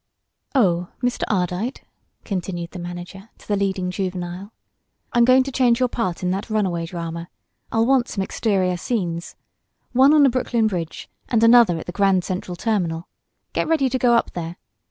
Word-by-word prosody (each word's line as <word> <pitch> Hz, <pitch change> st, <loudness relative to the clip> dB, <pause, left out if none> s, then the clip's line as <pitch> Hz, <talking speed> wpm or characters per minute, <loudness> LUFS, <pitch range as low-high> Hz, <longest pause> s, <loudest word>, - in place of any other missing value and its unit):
"Oh, 180 Hz, -8 st, +2 dB
Mr. 245 Hz, 0 st, 0 dB
Ardite," 190 Hz, +5 st, -1 dB, 0.4 s
continued 175 Hz, -3 st, -4 dB
the 185 Hz, -, -8 dB
manager 175 Hz, +4 st, -8 dB
to -, -, -19 dB
the 205 Hz, -, +1 dB
leading 190 Hz, -2 st, -1 dB
juvenile, 185 Hz, +1 st, -4 dB, 0.6 s
"I'm 240 Hz, 0 st, +5 dB
going 255 Hz, +1 st, +6 dB
to 275 Hz, -, -5 dB
change 245 Hz, -2 st, +3 dB
your 255 Hz, -1 st, +2 dB
part 185 Hz, -8 st, -2 dB
in 180 Hz, -, +1 dB
that 195 Hz, +5 st, -3 dB
runaway 185 Hz, -6 st, 0 dB
drama. 170 Hz, 0 st, -6 dB, 0.4 s
I'll 225 Hz, 0 st, +2 dB
want 260 Hz, -1 st, +3 dB
some 195 Hz, -, -2 dB
exterior 190 Hz, -3 st, 0 dB
scenes. 175 Hz, -5 st, -3 dB, 0.6 s
One 265 Hz, +3 st, +6 dB
on 300 Hz, -, +6 dB
the 275 Hz, -, +6 dB
Brooklyn 240 Hz, -2 st, 0 dB
Bridge 175 Hz, -6 st, -3 dB, 0.2 s
and 230 Hz, -2 st, +2 dB
another 230 Hz, -6 st, +6 dB
at 160 Hz, -, -7 dB
the -, -, -5 dB
Grand 195 Hz, -1 st, +2 dB
Central 180 Hz, -1 st, -4 dB
Terminal. 175 Hz, -5 st, -1 dB, 0.5 s
Get -, -, 0 dB
ready 310 Hz, -5 st, +2 dB
to 260 Hz, +1 st, -1 dB
go 240 Hz, -1 st, +4 dB
up 230 Hz, -, +1 dB
there. 170 Hz, 0 st, -5 dB
195 Hz, 175 wpm, -22 LUFS, 175-235 Hz, 0.6 s, going